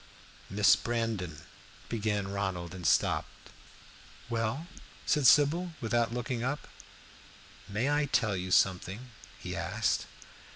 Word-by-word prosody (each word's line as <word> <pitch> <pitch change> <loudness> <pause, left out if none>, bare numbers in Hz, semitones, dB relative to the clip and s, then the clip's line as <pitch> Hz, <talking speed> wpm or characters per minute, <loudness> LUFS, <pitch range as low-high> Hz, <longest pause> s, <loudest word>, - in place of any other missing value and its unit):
"Miss 100 0 +5
Brandon" 110 -10 -3 0.4
began 105 -3 -1
Ronald, 95 -4 -3
and 90 -3 -3
stopped. - - 0 0.8
"Well?" 115 +7 -1 0.4
said 150 -4 +4
Sybil, 165 +6 +4
without 115 0 +1
looking 120 0 -3
up. 145 +4 -2 1.0
"May 110 +6 0
I 145 0 +2
tell 115 -7 +1
you 90 0 -4
something?" 95 +6 +1 0.3
he - - -6
asked. - - 0
115 Hz, 110 wpm, -30 LUFS, 95-130 Hz, 1.0 s, Miss